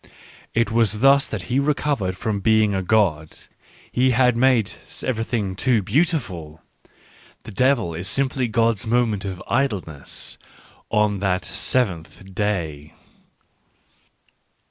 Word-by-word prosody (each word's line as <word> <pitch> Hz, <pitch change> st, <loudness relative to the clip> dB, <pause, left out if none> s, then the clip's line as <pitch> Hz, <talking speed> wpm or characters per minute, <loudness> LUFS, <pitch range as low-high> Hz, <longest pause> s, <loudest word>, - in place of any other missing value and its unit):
It 115 Hz, -1 st, +2 dB
was 110 Hz, -2 st, +3 dB
thus 140 Hz, +1 st, +5 dB
that 105 Hz, -5 st, -5 dB
He 125 Hz, +6 st, 0 dB
recovered 140 Hz, -9 st, 0 dB
from 110 Hz, -2 st, -2 dB
being 110 Hz, 0 st, +3 dB
a 95 Hz, -, 0 dB
God.... 90 Hz, -6 st, +1 dB, 0.5 s
He 130 Hz, +1 st, +2 dB
had 125 Hz, -1 st, +3 dB
made 120 Hz, -3 st, +3 dB, 0.3 s
everything 110 Hz, -5 st, -2 dB
too 115 Hz, +1 st, +2 dB
beautiful.... 100 Hz, -, -1 dB, 0.8 s
The -, -, -9 dB
devil 125 Hz, -6 st, +1 dB
is 85 Hz, +4 st, -5 dB
simply 130 Hz, -2 st, -1 dB
God's 115 Hz, -1 st, +1 dB
moment 110 Hz, -4 st, +1 dB
of 95 Hz, -2 st, -5 dB
idleness, 100 Hz, -, -3 dB, 0.5 s
on 105 Hz, -2 st, +1 dB
that 90 Hz, -3 st, 0 dB
seventh 95 Hz, -, -3 dB
day. 80 Hz, -8 st, -3 dB
110 Hz, 115 wpm, -22 LUFS, 95-125 Hz, 0.8 s, thus